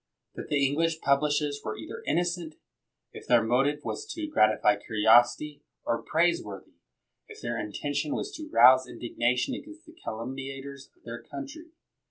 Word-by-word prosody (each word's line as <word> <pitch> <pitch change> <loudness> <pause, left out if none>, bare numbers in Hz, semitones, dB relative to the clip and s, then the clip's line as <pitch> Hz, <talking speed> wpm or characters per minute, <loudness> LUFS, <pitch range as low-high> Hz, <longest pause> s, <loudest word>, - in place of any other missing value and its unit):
That - - -8
the 140 -2 +2
English 160 +4 0
publishers 145 0 +1
were - - -4
either 455 +9 -8
innocent, 175 -2 -1 0.6
if - - -11
their 120 -2 +5
motive 135 +6 +1
was - - -3
to 325 -2 -3
gratify 120 - +3
curiosity, 120 +7 +3 0.2
or 115 - 0
praiseworthy, 155 - -1 0.5
if - - -12
their 120 0 -3
intention 145 +8 -3
was 410 - -4
to 315 -6 -8
rouse 130 - +6
indignation 125 - -1
against 310 +5 -9
the 320 - -15
calumniators 135 - -7
of 355 - -32
their - - -7
country. 315 +4 -9
145 Hz, 145 wpm, -28 LUFS, 125-175 Hz, 0.6 s, rouse